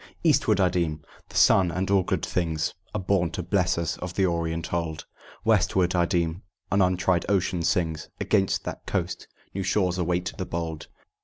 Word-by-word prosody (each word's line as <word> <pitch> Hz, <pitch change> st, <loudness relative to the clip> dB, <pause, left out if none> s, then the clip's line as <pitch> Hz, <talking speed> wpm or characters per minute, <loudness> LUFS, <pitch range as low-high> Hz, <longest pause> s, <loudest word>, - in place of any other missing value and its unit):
"Eastward, 145 Hz, -, +3 dB
I 95 Hz, -, +5 dB
deem: 80 Hz, -4 st, -1 dB, 0.3 s
the -, -, -13 dB
sun 95 Hz, -2 st, +5 dB
and 95 Hz, +3 st, -2 dB
all 100 Hz, -1 st, +5 dB
good -, -, -1 dB
things 80 Hz, -3 st, -1 dB, 0.2 s
Are -, -, 0 dB
born 95 Hz, -2 st, +1 dB
to 90 Hz, -, -3 dB
bless 90 Hz, 0 st, +1 dB
us 85 Hz, -2 st, -2 dB
of 90 Hz, -1 st, -6 dB
the 95 Hz, -, +3 dB
Orient 85 Hz, -1 st, -2 dB
old." 85 Hz, -2 st, -2 dB, 0.4 s
"Westward, 95 Hz, -4 st, +3 dB
I 85 Hz, -1 st, +3 dB
deem: 85 Hz, +1 st, 0 dB, 0.3 s
an 100 Hz, -, +3 dB
untried 90 Hz, -1 st, +2 dB
ocean 95 Hz, -3 st, +1 dB
sings 80 Hz, -2 st, 0 dB
Against 95 Hz, -3 st, +1 dB
that -, -, -7 dB
coast, -, -, -2 dB, 0.3 s
'New 95 Hz, -, -2 dB
shores 95 Hz, -1 st, +1 dB
await 90 Hz, +1 st, -1 dB
the 95 Hz, -, -2 dB
bold.'" 80 Hz, -2 st, -4 dB
90 Hz, 175 wpm, -26 LUFS, 85-95 Hz, 0.4 s, I